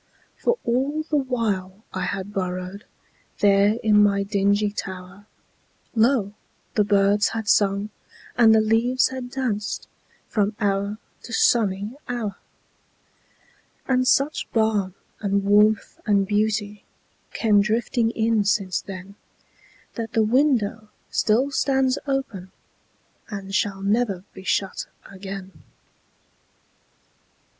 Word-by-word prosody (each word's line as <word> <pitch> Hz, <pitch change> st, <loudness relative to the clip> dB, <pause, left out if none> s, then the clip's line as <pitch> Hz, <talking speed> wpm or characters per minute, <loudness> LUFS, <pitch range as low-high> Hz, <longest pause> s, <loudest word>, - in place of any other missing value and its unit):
For 475 Hz, 0 st, 0 dB
all 270 Hz, +6 st, 0 dB
the 310 Hz, -1 st, -3 dB
while 220 Hz, -8 st, -1 dB
I 185 Hz, -1 st, -2 dB
had 200 Hz, +1 st, -4 dB
burrowedThere 195 Hz, +2 st, -1 dB
in 210 Hz, -1 st, +5 dB
my 200 Hz, -1 st, +3 dB
dingy 205 Hz, +1 st, +1 dB
tower, 190 Hz, 0 st, -8 dB, 0.7 s
Lo! 225 Hz, -3 st, +2 dB, 0.4 s
the 210 Hz, -, +3 dB
birds 200 Hz, 0 st, +3 dB
had 220 Hz, -2 st, -4 dB
sung 200 Hz, +1 st, +2 dB, 0.4 s
and 225 Hz, -2 st, +6 dB
the 220 Hz, -, +5 dB
leaves 230 Hz, +4 st, +2 dB
had 260 Hz, -1 st, -6 dB
dancedFrom 210 Hz, -3 st, -3 dB
hour 200 Hz, 0 st, 0 dB, 0.2 s
to -, -, -11 dB
sunny 205 Hz, -3 st, +2 dB, 0.2 s
hour. 225 Hz, -5 st, -3 dB, 1.5 s
And 255 Hz, -1 st, +2 dB
such 280 Hz, +4 st, +1 dB
balm 215 Hz, -4 st, +1 dB, 0.2 s
and 200 Hz, -1 st, 0 dB
warmth 210 Hz, +1 st, +3 dB
and 200 Hz, -2 st, +3 dB
beautyCame 210 Hz, 0 st, -1 dB
drifting 225 Hz, +2 st, 0 dB
in 225 Hz, -2 st, +1 dB
since 195 Hz, -2 st, 0 dB
then, 190 Hz, 0 st, -9 dB, 0.8 s
That 230 Hz, -2 st, -5 dB
the 225 Hz, -, +3 dB
window 225 Hz, -3 st, +1 dB, 0.2 s
still 245 Hz, +6 st, +2 dB
stands 265 Hz, -1 st, +1 dB
openAnd 200 Hz, -4 st, -7 dB
shall 195 Hz, -1 st, -1 dB
never 200 Hz, -3 st, 0 dB
be -, -, -10 dB
shut 195 Hz, 0 st, -1 dB, 0.2 s
again. 195 Hz, 0 st, -8 dB
210 Hz, 100 wpm, -23 LUFS, 200-230 Hz, 1.5 s, and